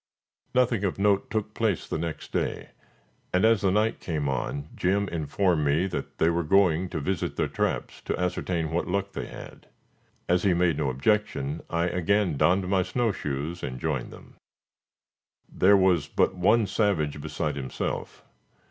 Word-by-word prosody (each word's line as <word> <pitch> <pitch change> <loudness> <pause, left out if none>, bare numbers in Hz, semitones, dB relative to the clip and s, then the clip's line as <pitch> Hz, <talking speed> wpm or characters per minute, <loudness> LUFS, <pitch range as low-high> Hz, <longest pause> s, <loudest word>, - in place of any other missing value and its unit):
Nothing 125 -5 +2
of 95 - -1
note 100 0 +2
took 110 -1 -2
place 110 -6 0
the - - -3
next 80 -1 -5
day, - - -2 0.6
and, 90 +3 +3
as 115 -3 +4
the 100 - +2
night 105 +4 +1
came 75 -4 -2
on, 70 +2 -3
Jim 100 +2 +1
informed 85 +1 0
me 75 +5 +2
that 95 - -5
they 80 - +3
were 85 +1 0
going 90 0 +3
to 80 - -3
visit 90 +4 -2
their - - 0
traps - - -2
to - - -2
ascertain 85 -2 -1
what 85 - -1
luck 100 +2 -1
they - - -4
had. - - -11 0.6
As 90 +1 +3
he 95 -2 +3
made 85 -3 +2
no 75 -3 +1
objection, 70 - 0
I 85 0 0
again 90 0 +1
donned 90 +6 +2
my 95 0 +2
snow 115 +4 0
shoes 75 +1 -4
and 65 0 -5
joined 75 -5 -2
them. - - -14 1.1
There 100 +2 +4
was 90 -6 +3
but - - +1
one 105 +5 +3
savage 90 -8 0
beside 75 0 -3
himself. 65 -2 -4
90 Hz, 165 wpm, -26 LUFS, 80-100 Hz, 1.1 s, as